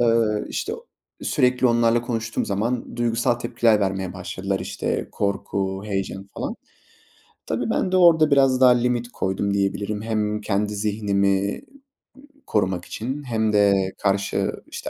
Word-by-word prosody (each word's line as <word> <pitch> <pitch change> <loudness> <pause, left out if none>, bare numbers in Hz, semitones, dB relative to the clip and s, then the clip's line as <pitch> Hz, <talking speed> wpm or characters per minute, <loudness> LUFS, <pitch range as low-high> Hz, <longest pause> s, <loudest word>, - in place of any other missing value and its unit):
Iıı, 115 -3 +2
işte, 435 - -3 0.5
sürekli 125 -2 +2
onlarla 115 0 +3
konuştuğum 115 -2 -2
zaman 115 +5 -2
duygusal 120 +1 +1
tepkiler 120 -2 +2
vermeye 95 -2 -1
başladılar. - - -3
İşte, - - -3
korku, 100 -1 -2
heyecan 95 -1 -3
falan. - - -4 0.9
Tabii, - - -2
ben 185 - 0
de 185 - +4
orada 165 -4 +6
biraz 135 -2 +4
daha 125 - +8
limit 120 0 +1
koydum 100 +1 -1
diyebilirim. 100 +1 -1
Hem 105 -1 -1
kendi 105 0 -1
zihnimi 100 -1 0 0.9
korumak 95 -4 0
için 135 +6 -5
hem 110 -4 0
de 100 -1 +5 0.2
karşı, 100 0 0 0.2
işte, - - -6
110 Hz, 130 wpm, -23 LUFS, 100-120 Hz, 0.9 s, daha